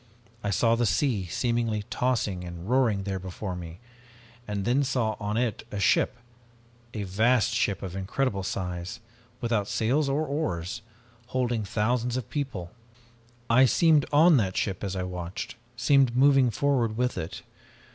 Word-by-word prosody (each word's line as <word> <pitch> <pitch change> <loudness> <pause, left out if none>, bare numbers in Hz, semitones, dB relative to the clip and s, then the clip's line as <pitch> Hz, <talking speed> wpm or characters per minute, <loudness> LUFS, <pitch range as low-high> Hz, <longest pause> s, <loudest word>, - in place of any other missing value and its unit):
I 105 - -1
saw 115 +4 +3
the 120 0 +2
sea, 110 -8 +1
seemingly 115 +1 -1
tossing 115 -8 0
and 85 0 -8
roaring 115 -5 +2
there 95 -1 -3
before 95 +1 -5
me, 85 -1 -8 0.7
and 100 -2 -3
then 130 +5 +3
saw 120 -5 0
on 105 0 -2
it 120 -3 -1
a 105 - -3
ship, 100 +4 +2 0.8
a 105 - -2
vast 110 +4 +2
ship 100 -4 0
of 95 - -4
size 95 - -5
incredible, 100 +1 -1 1.0
without 115 -4 0
sails 135 +8 +1
or 145 +3 0
oars, 115 - -3 0.5
holding 120 -3 -1
thousands 120 +4 0
of 125 - -6
people. 130 - -4 0.8
I 130 +3 +6
seemed 155 +2 +4
on 155 +2 +6
that 95 -6 0
ship 95 -2 -1
as 95 -1 -3
I 95 - -2
watched, 90 -1 -5 0.2
seemed 130 0 +3
moving 135 -1 +5
forward 115 -1 0
with 125 0 0
it. 80 - -5
115 Hz, 150 wpm, -27 LUFS, 95-130 Hz, 1.0 s, I